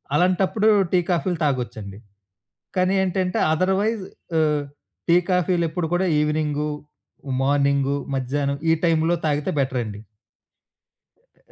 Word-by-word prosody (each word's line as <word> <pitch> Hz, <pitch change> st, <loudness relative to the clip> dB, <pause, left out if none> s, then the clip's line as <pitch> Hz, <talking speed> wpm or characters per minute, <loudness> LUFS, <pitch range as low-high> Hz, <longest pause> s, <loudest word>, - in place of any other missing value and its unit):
అలాంటప్పుడు 185 Hz, +5 st, +2 dB, 0.2 s
టీ, 180 Hz, -, +4 dB
కాఫీలు 175 Hz, +1 st, 0 dB
తాగొచ్చండి. 110 Hz, -7 st, -3 dB, 0.8 s
కానీ 185 Hz, +1 st, +2 dB
ఏంటంటే 185 Hz, 0 st, -1 dB
అథర్‌వైజ్ 190 Hz, +6 st, +1 dB, 0.4 s
ఆహ్, 150 Hz, -2 st, +2 dB, 0.5 s
టీ, 170 Hz, -, +6 dB
కాఫీలెప్పుడు 175 Hz, -2 st, +1 dB
కూడా 185 Hz, +2 st, +1 dB
ఈవినింగు, 150 Hz, 0 st, 0 dB, 0.7 s
మార్నింగు, 140 Hz, 0 st, +2 dB, 0.2 s
మధ్యాహ్నం 140 Hz, +2 st, -1 dB
ఈ 160 Hz, -, +6 dB
టైములో 165 Hz, 0 st, +2 dB
తాగితే 150 Hz, -1 st, 0 dB
బెటరండి. 120 Hz, -6 st, -2 dB, 1.2 s
ఎ -, -, -37 dB
155 Hz, 100 wpm, -23 LUFS, 140-180 Hz, 1.2 s, టీ